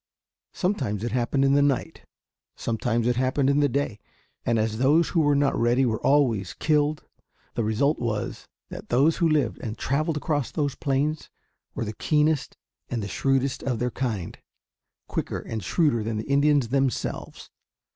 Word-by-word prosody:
Sometimes 130 - -1
it 120 - -2
happened 130 +3 +1
in 135 - +3
the 145 - +4
night. 140 -3 -1 0.5
Sometimes 115 0 -1
it 120 0 +1
happened 130 +2 +2
in 140 - +2
the 145 -1 +3
day. 130 -5 -2 0.4
And 115 - +1
as 110 0 -1
those 150 +6 +4
who 170 - +1
were 145 -2 +3
not 140 0 +2
ready 120 +3 +2
were 110 -3 -1
always 120 - +2
killed, 150 -1 +1 0.5
the 115 - -1
result 120 +8 +1
was 110 -3 -3 0.2
that - - -9
those 140 +7 +3
who 170 - +2
lived 145 -7 +1
and 110 -1 -5
traveled 155 +4 0
across 145 -3 -1
those 145 -3 -1
plains 145 +2 -1 0.5
were - - -2
the 105 - -4
keenest 150 +4 +1 0.3
and 110 -5 -3
shrewdest 135 +4 0
of 125 -3 -1
their 125 +2 -1
kind 110 -10 -3 0.7
quicker - - -3
and 110 -3 -5
shrewder 145 - +2
than 110 0 -3
the 110 - -5
Indians 140 -2 +3
themselves. 135 0 -2
135 Hz, 165 wpm, -25 LUFS, 115-145 Hz, 0.7 s, the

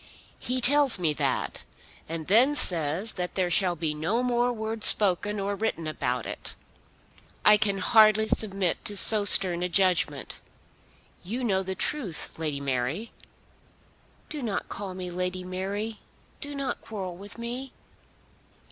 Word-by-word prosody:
He 255 +1 -2
tells 280 -1 +6
me 165 -4 0
that, - - -2 0.5
and 165 -1 -4
then 245 - +4
says 170 - +1
that 180 -1 -5
there 180 -2 -1
shall 180 0 +3
be 160 -2 -3
no 165 +11 -2
more 245 0 0
words 220 -1 -2
spoken 205 +1 +2
or 200 +1 -3
written 200 -6 -3
about 125 -6 -3
it. - - -6 0.9
I 210 0 +7
can 205 -2 0
hardly 215 +2 +4
submit 195 -5 -1
to 205 -2 0
so 210 +1 +8
stern 180 -3 +5
a 180 - -2
judgment. 185 -1 0 0.8
You 230 +8 -5
know 195 -5 0
the 190 0 -5
truth, 200 - -3
Lady 150 -3 -2
Mary." 140 - -3 1.2
"Do 300 -2 -6
not 220 -5 -4
call 195 -2 -6
me 180 -1 -6
Lady 180 +1 -3
Mary. 200 +4 -5 0.4
Do 290 -1 -4
not 275 -1 -4
quarrel 190 -5 -7
with 200 +5 -12
me." 245 +3 -6
195 Hz, 145 wpm, -26 LUFS, 175-225 Hz, 1.2 s, so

